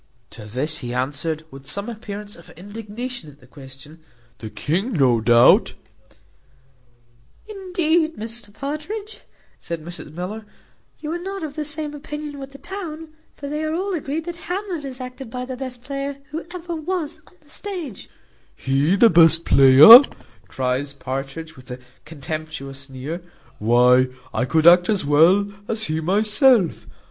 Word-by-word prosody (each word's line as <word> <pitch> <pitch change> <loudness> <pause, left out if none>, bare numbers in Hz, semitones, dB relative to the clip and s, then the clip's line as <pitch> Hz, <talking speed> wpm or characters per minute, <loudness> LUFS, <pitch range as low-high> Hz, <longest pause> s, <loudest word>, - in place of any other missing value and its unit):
To 105 - -11
this 140 +8 -2
he 120 -1 -5
answered, 145 +5 -2
with 135 0 -12
some 200 +2 -4
appearance 210 -3 -7
of 170 - -16
indignation 215 +1 -7
at 145 0 -18
the 125 - -19
question, 135 +4 -12 0.4
"The 110 - -7
king, 190 - -2
without 125 - +2
doubt." 120 - +6 1.7
"Indeed, 345 -5 0
Mr 225 -1 -7
Partridge," 305 - -6 0.4
says 170 - -5
Mrs 165 -1 -10
Miller, 195 +6 -6 0.5
"you 305 0 -4
are 345 - -3
not 385 0 -6
of 300 -2 -5
the 310 - -3
same 300 0 -3
opinion 295 0 -7
with 270 0 -8
the 275 - -12
town; 325 -3 -7 0.3
for 280 - -8
they 300 +2 -3
are 310 +1 -1
all 385 +3 -2
agreed, 315 -1 -3
that 345 -1 -6
Hamlet 365 -4 -3
is 265 -2 -7
acted 255 0 -8
by 250 +2 -5
the 260 0 -6
best 250 -2 -7
player 275 +1 -4
who 320 +2 -6
ever 350 -1 -6
was 325 -1 -4
on - - -21
the 295 - -25
stage." 350 - -6 0.5
"He 140 +7 +1
the 225 +2 +6
best 165 0 +5
player!" 135 - +10 0.5
cries 130 +2 -2
Partridge, 140 +4 -6
with 130 -1 -15
a 125 - -6 0.3
contemptuous 155 -2 -6
sneer, 135 +6 -6 0.4
"why, 125 +3 +4 0.3
I - - 0
could 160 +4 +1
act 175 +1 +7
as 205 -8 +1
well 180 +8 +4
as 220 -1 -2
he 155 -3 -2
myself. 210 - +2
210 Hz, 155 wpm, -22 LUFS, -, 1.7 s, player